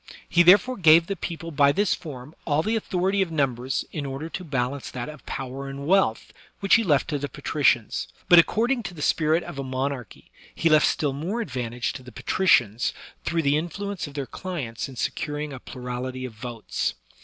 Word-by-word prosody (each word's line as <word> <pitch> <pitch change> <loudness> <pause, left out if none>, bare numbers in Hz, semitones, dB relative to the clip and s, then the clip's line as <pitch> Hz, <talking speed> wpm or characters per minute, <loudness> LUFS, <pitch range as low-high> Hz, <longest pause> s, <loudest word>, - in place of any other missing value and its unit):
He 175 - +4
therefore 200 +9 +6
gave 165 -2 +7
the 195 - -3
people 165 -1 -6
by 140 -1 +4
this 200 +5 +2
form 145 -4 -8
all 150 0 +1
the 220 +4 0
authority 195 -2 0
of 185 -3 0
numbers 135 -4 0
in 150 - -4
order 140 +3 -5
to 185 - -5
balance 135 -3 -2
that 120 0 -5
of 150 -3 -10
power 135 +1 -5
and 140 +1 -6
wealth, 185 - +2 0.3
which 195 - +2
he 230 - +6
left 145 - +2
to 145 -2 -1
the 145 0 -4
patricians. 140 -6 +1 0.2
But, 175 - +9
accord 225 +8 +3
ing 260 -3 +1
to 180 -4 -7
the 150 - -5
spirit 160 +2 +2
of 140 - -7
a - - -2
monarchy, 130 -3 -4 0.2
he 165 - +2
left 155 -1 +5
still 145 -3 0
more 165 +11 -3
advan 125 - -4
tage 120 +1 -2
to - - -8
the 125 0 -12
patricians 125 - +2 0.3
through 165 -1 0
the 140 +1 +3
influence 185 +3 -4
of 145 - -12
their 140 -2 -2
clients 140 -9 -5
in 130 - -10
securing 150 +3 -3
a 130 - -7
plurality 125 +1 -5
of 125 - -7
votes. 115 0 -3
145 Hz, 200 wpm, -25 LUFS, 130-175 Hz, 0.3 s, But